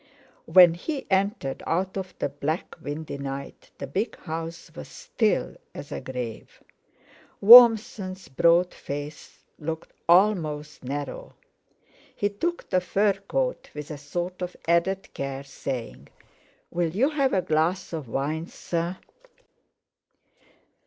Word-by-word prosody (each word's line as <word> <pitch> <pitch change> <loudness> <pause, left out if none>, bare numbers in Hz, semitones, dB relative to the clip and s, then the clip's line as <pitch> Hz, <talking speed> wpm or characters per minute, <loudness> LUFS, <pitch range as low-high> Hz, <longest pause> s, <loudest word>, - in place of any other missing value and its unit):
When 175 0 +8
he 275 - -4
entered 190 - 0
out 185 +3 0
of 190 -2 -5
the - - -1
black 145 +4 -3
windy 145 -1 -5
night, 140 0 -7
the - - -5
big 195 - -3
house 165 0 -6
was - - -8
still - - -1 0.2
as - - -8
a - - -4
grave. 125 -4 -7 0.8
Warmson's 215 -4 +7
broad 170 +6 +3
face 145 +1 -8 0.2
looked 160 +1 -5 0.2
almost 160 -7 +2
narrow; 140 +1 -5 0.8
he 205 - 0
took 340 +13 -3
the 185 - +1
fur 200 +3 +2
coat - - -3
with 150 +1 -7
a 150 - -5
sort 175 +6 -4
of 180 0 -5
added 175 +3 +1
care, 135 0 -4
saying: 120 - -6 0.6
"Will 170 -1 0
you 235 - +1
have 275 -3 +1
a 185 - +2
glass 170 +4 0
of 155 -6 -4
wine, 150 +7 -2
sir?" 170 +2 -3
170 Hz, 125 wpm, -26 LUFS, 145-190 Hz, 0.8 s, When